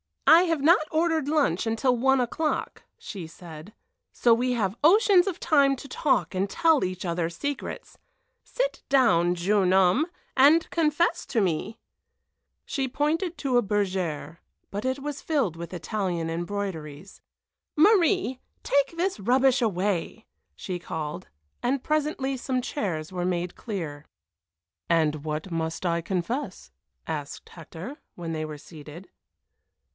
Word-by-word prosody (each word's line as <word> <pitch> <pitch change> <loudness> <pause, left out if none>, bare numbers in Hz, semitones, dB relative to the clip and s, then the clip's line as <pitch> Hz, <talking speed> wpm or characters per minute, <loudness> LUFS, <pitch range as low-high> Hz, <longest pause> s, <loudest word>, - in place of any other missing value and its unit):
"I 335 +2 +8
have 330 -5 0
not 310 +1 +4
ordered 320 -2 +1
lunch 285 - +1
until 235 +3 +1
one 265 +2 +3
o'clock," 300 +6 -2
she 185 -6 -7
said, 160 +2 -11 0.4
"so 235 - +3
we 250 +2 +1
have 210 -3 -1
oceans 385 +2 +5
of 370 -3 -3
time 280 -4 +4
to 275 - -10
talk 250 - 0
and 190 +2 -1
tell 325 +2 +3
each 185 0 -3
other 170 -1 -1
secrets. 280 +12 -6 0.4
Sit - - -2
down, 180 -10 +4
jeune 185 +1 +2
homme, 190 - +4 0.3
and 295 +5 +5
confess 335 +2 +1
to 230 - +1
me." 190 +4 -1 0.9
She 270 -3 -2
pointed 320 +6 -1
to 260 -4 +1
a - - +5
bergère, 185 -7 -2 0.3
but 205 +4 -4
it 260 +1 -1
was 290 0 -5
filled 270 - 0
with 170 +2 -8
Italian 180 -3 -2
embroideries. 175 -2 -5 0.5
"Marie, 365 - +3 0.2
take 280 +4 +1
this 365 - -1
rubbish 255 +5 +3
away!" 205 0 -1 0.3
she 180 -2 -5
called, 160 +1 -5 0.3
and 255 +2 0
presently 295 -3 -1
some 255 0 -1
chairs 190 - -3
were 180 -1 -3
made 180 -1 -2
clear. 160 -10 -6 0.8
"And 155 -3 +2
what 155 +3 -4
must 165 +1 -3
I 170 -1 +1
confess?" 190 - -4 0.3
asked 150 -3 -6
Hector, 170 - -9 0.2
when 170 -2 -5
they 155 -1 -3
were 155 -1 -7
seated. 155 +3 -12
210 Hz, 135 wpm, -26 LUFS, 170-285 Hz, 0.9 s, I